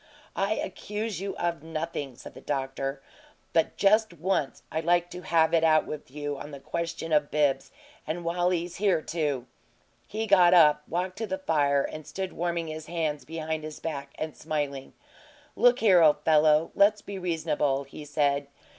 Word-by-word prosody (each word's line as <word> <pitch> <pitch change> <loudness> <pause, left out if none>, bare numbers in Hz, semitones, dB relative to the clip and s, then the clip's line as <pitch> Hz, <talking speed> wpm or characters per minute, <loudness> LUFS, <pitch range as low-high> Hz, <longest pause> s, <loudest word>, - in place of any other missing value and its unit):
"I 200 +2 +1
accuse 210 +1 -4
you 195 0 -4
of 170 -3 -1
nothing," 160 -4 -4
said - - -11
the - - -12
doctor. 135 0 -3 0.5
"But 165 - +1
just 215 +1 +3
once 170 -4 -1
I'd 160 +2 -2
like 175 +1 +2
to 180 - -7
have 165 -2 +2
it 165 -1 +4
out 155 -1 +4
with 150 -3 -7
you 145 +1 -4
on - - -8
the 140 -2 -9
question 165 +1 -4
of 150 -1 +3
Bibbs 145 -3 +1 0.4
and 170 +2 -3
while 175 +1 +1
he's 175 -1 -2
here, 185 -6 +2
too." 145 -6 -2 0.6
He 220 +1 -3
got 180 -4 +6
up, 150 -4 +6
walked 180 +3 -3
to 225 - -2
the 190 -1 -2
fire, 145 -6 +2
and 155 -1 -7
stood 190 -1 -4
warming 170 -1 -2
his 155 0 -7
hands 160 -3 -2
behind 160 -1 -4
his 155 0 -7
back 140 -4 -5
and 155 -1 -4
smiling. 140 -3 -4 0.6
"Look 245 +1 +4
here, 190 -6 +6
old 150 -2 +4
fellow, 155 0 +4
let's 205 +1 +4
be 200 -1 -6
reasonable," 155 -5 0
he 140 +2 -10
said. 145 -1 0
160 Hz, 175 wpm, -27 LUFS, 150-180 Hz, 0.6 s, got